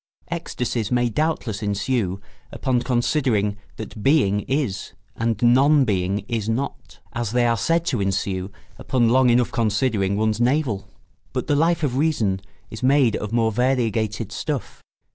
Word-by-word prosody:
Ecstasies 125 -9 -3
may 120 -1 +2
doubtless 130 -5 -1
ensue 100 -1 -1 0.3
upon 125 -2 0
considering 120 -5 +1 0.2
that 110 0 -8
Being 115 -7 +3
is 135 -8 -2 0.2
and 115 -2 -1
Non 135 +4 +5
Being 100 -1 -1
is 115 -3 -2
not, 125 +5 -4
as 120 -2 -3
they 125 -1 +3
are 115 -1 +3
said 165 +9 +1
to 125 - 0
ensue 95 -1 -1 0.3
upon 120 -3 +1
long 130 +1 +4
enough 120 0 +3
considering 105 -3 0
one's 110 +1 0
navel; 125 -5 +1 0.5
but - - -2
the 145 - +1
Life 165 +2 +2
of 130 -3 0
Reason 115 -11 +1 0.3
is 110 - -8
made 130 -3 +3
of 105 - -5
more 115 -1 +2
variegated 115 -3 0
stuff. 145 +2 -4
120 Hz, 145 wpm, -22 LUFS, 105-130 Hz, 0.5 s, Non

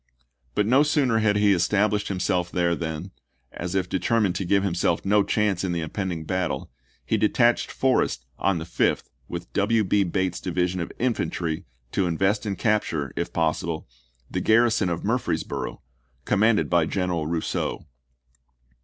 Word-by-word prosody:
But 105 - +2
no 130 +6 +5
sooner 145 -6 +2
had 105 -2 +2
he 105 -1 +4
established 105 +3 +1
himself 90 -2 0
there 85 -1 +1
than, 80 +2 -5 0.4
as 90 +2 -5
if 95 -2 +1
deter 95 +7 +1
mined 100 -5 +2
to 95 - -3
give 100 +2 +2
himself 90 -1 0
no 105 +1 +4
chance 100 -2 0
in 90 -2 -1
the 85 - -1
impending 85 0 -3
battle, 90 -6 -2 0.3
he - - +1
detached - - +3
Forrest - - +1
on 95 -1 +2
the 80 - -5
5th - - 0 0.2
with 85 +1 -7
W. 110 +2 +2
B. 100 +1 +2
Bate's 90 -1 -1
division 90 0 -1
of 85 - -4
infantry 85 -8 -1 0.3
to 95 - +1
invest 95 +6 0
and 100 - -2
capture, 85 - 0
if - - -2
possible, 80 -1 -1 0.4
the - - -3
garrison 115 -3 +3
of 85 - -3
Murfreesboro', - - -2 0.4
commanded 105 +1 +3
by 85 -2 +2
General 90 -5 -1
Rousseau. 80 -1 -2
95 Hz, 155 wpm, -25 LUFS, 85-105 Hz, 0.4 s, no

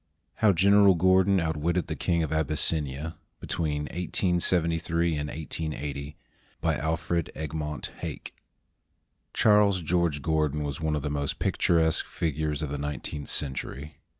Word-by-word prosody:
HOW 105 - +5
GENERAL 100 +2 +5
GORDON 95 +2 +4
OUTWITTED 80 +2 0
THE - - -4
KING 85 -2 +1
OF 80 - -3
ABYSSINIA 75 -1 0 0.2
[Between 75 -3 -2
1873 85 -1 0
and 75 0 -3
1880] 75 -3 -5 0.4
BY - - +1
ALFRED 80 +1 -1
EGMONT 75 -1 -4
HAKE - - -6 1.0
[Charles 105 -4 +4
George' 85 -3 0
Gordon 75 -2 +1
was 70 0 -4
one 80 -1 0
of 75 - -3
the 75 - -2
most 70 -1 -2
picturesque 80 -2 +2
figures 75 -1 -2
of 75 - -3
the 75 - -3
nineteenth 75 0 -5
century. 70 +1 -4
80 Hz, 125 wpm, -27 LUFS, 75-85 Hz, 1.0 s, HOW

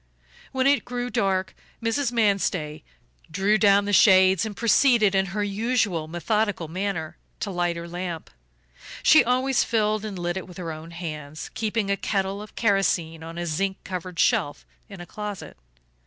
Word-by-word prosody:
When 260 0 0
it 280 +1 +3
grew 245 0 -4
dark 195 -4 0 0.3
Mrs. 235 +3 0
Manstey 195 -9 0 0.5
drew 200 +6 +1
down 200 -1 +4
the 205 - -2
shades 190 -1 +5
and 205 - -8
proceeded, 230 -3 +4
in 190 0 +2
her 205 +3 -2
usual 205 -5 0
methodical 195 +1 -1
manner, 175 -2 -4 0.2
to 205 - -2
light 175 -1 -1
her 170 0 -6
lamp. 175 -1 -6 0.7
She 310 - +7
always 255 +2 +2
filled 215 -2 0
and 210 -3 -5
lit 175 +1 -2
it 190 - -6
with 180 - -12
her 170 -3 -5
own 155 +1 -9
hands, 155 -3 -7
keeping 215 -2 -1
a 200 - +1
kettle 195 0 -2
of 210 - -12
kerosene 190 -6 +1
on 165 +1 -8
a 175 - -3
zinc 190 +4 -1
covered 180 -1 -6
shelf 145 -2 +1 0.2
in 195 -3 -10
a - - -8
closet. 210 0 -7
195 Hz, 165 wpm, -24 LUFS, 175-215 Hz, 0.7 s, She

